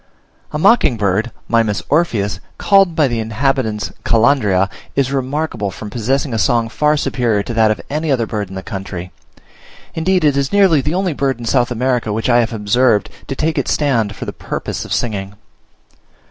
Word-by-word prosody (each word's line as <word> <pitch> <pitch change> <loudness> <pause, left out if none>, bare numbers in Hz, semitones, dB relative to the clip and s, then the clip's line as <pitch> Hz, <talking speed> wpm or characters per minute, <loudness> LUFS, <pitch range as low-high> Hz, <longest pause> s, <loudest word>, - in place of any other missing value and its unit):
A - - -2
mocking 220 - +4
bird 105 +2 0 0.2
(Mimus 115 -3 +1
orpheus), 110 - 0 0.2
called 195 -4 +4
by 150 -3 +3
the 120 -2 -2
inhabitants 110 -1 -1
Calandria, 110 -5 +3 0.3
is 135 -1 +1
remarkable, 135 -5 -2
from 105 +2 -8
possessing 130 +4 -1
a 110 - 0
song 115 +1 +2
far 150 +6 +1
superior 115 -7 0
to 120 - -5
that 110 -1 +3
of 105 -4 0
any 155 +2 -2
other 120 -4 +1
bird 105 -3 -4
in 95 - -9
the 95 - -6
country: 95 -3 -6 0.8
indeed, 180 +2 +1
it 145 -2 +3
is 140 -1 0
nearly 190 -7 +4
the 150 +5 -2
only 185 -3 0
bird 135 -2 -1
in 120 - -8
South 120 +1 +2
America 125 -2 0
which 110 +4 -1
I 120 0 +5
have 115 -1 +1
observed 115 +1 +1 0.2
to 135 - -4
take 155 +3 0
its - - 0
stand 115 -8 0
for - - -6
the - - -5
purpose - - -5
of - - -11
singing. 100 -4 -2
120 Hz, 185 wpm, -17 LUFS, 105-140 Hz, 0.8 s, I